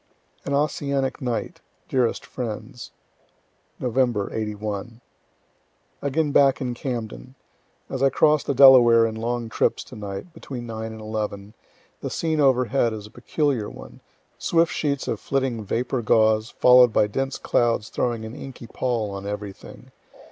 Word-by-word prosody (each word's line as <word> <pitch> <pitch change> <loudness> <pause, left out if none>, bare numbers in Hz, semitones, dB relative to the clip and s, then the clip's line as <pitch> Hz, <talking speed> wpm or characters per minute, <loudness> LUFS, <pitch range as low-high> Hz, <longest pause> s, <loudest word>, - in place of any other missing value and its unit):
AN 140 - -1
OSSIANIC 140 -2 -1
NIGHT 120 -3 -3 0.3
DEAREST 125 -3 0
FRIENDS 120 +1 -6 0.9
Nov., 120 -4 0
'81. 105 +1 -4 1.0
Again 145 +2 0
back 140 -2 +4
in 125 -2 -2
Camden. 120 0 -6 0.5
As 135 - -5
I 135 - +5
cross 150 +2 +3
the 140 - -2
Delaware 120 -4 +8
in 110 - -2
long 115 +1 -3
trips 110 - 0
tonight, 105 - -8
between 130 -7 -7
9 110 -1 -5
and 110 0 -9
11, 105 -1 -4 0.5
the - - -4
scene 160 -2 -1
overhead 130 -3 +2
is 105 -2 -7
a 105 - -14
peculiar 130 -3 -1
one - - -12 0.4
swift 165 0 +2
sheets 140 -3 -1
of 110 - -2
flitting 130 -5 -1
vapor 120 +5 -2
gauze, 110 0 +3
follow'd 125 -1 +6
by 105 - +3
dense 135 +6 -3
clouds 115 -3 +1
throwing 115 -2 -2
an 110 - -8
inky 135 -4 -9
pall 115 -3 -2
on 100 0 -6
everything. 105 -1 -8
120 Hz, 140 wpm, -24 LUFS, 110-135 Hz, 1.0 s, Delaware